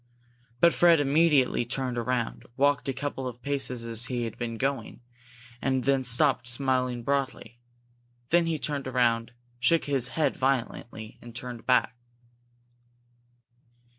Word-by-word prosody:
But 170 - +6
Fred 170 -2 +5
immediately 145 -3 +3
turned 125 +1 -3
around, 120 0 -2
walked 140 0 +2
a - - +2
couple 135 0 -4
of 125 0 -9
paces 135 -4 -1
as 115 +1 +2
he 125 -1 -2
had 115 -1 -5
been 115 -1 -4
going, 135 -2 -3 0.6
and 130 -1 0
then 135 0 +2
stopped, 125 0 +2
smiling 125 -1 0
broadly. 135 -2 -2 0.7
Then 170 0 +4
he 165 -1 0
turned 145 -2 -3
around, 120 -2 +1 0.3
shook 165 +6 +2
his 135 -4 0
head 155 - +2
violently, 120 -4 -3
and 120 -1 -12
turned 125 -2 -8
back. 125 -1 +3
130 Hz, 135 wpm, -27 LUFS, 120-140 Hz, 0.7 s, But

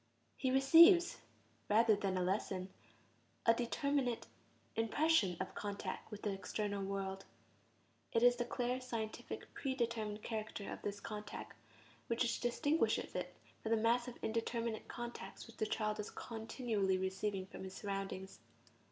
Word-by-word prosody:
He 260 - 0
receives, 335 +7 +7 0.5
rather 220 +1 +6
than 195 -2 -1
a 180 - +1
lesson, 185 0 -1 0.8
a 230 - +7
determinate 245 +1 0 0.5
impression 225 - +3
of - - -3
contact 200 -2 -4
with 210 -2 -8
the 205 - 0
external 200 +1 -2
world; 195 0 -3 0.9
it 230 - +3
is 245 0 +7
the 240 - +1
clear, 250 +1 -1
scientific, 230 -3 -5
pre 265 -2 -2
determined 220 -4 -1
character 215 -2 -4
of - - -8
this 205 0 -3
contact 210 0 -6 0.5
which 235 0 +1
distinguishes 290 +6 +1
it - - -4 0.3
from 220 - -3
the 225 - +4
mass 235 +2 +3
of 245 - -7
indeterminate 230 0 -1
contacts 240 0 -6
which 230 - -14
the 215 - 0
child 215 -1 -1
is 210 - -3
continually 220 -4 -1
receiving 190 +1 -1
from 190 - -9
his 190 0 -7
surroundings. 195 - -4
220 Hz, 140 wpm, -37 LUFS, 200-240 Hz, 0.9 s, receives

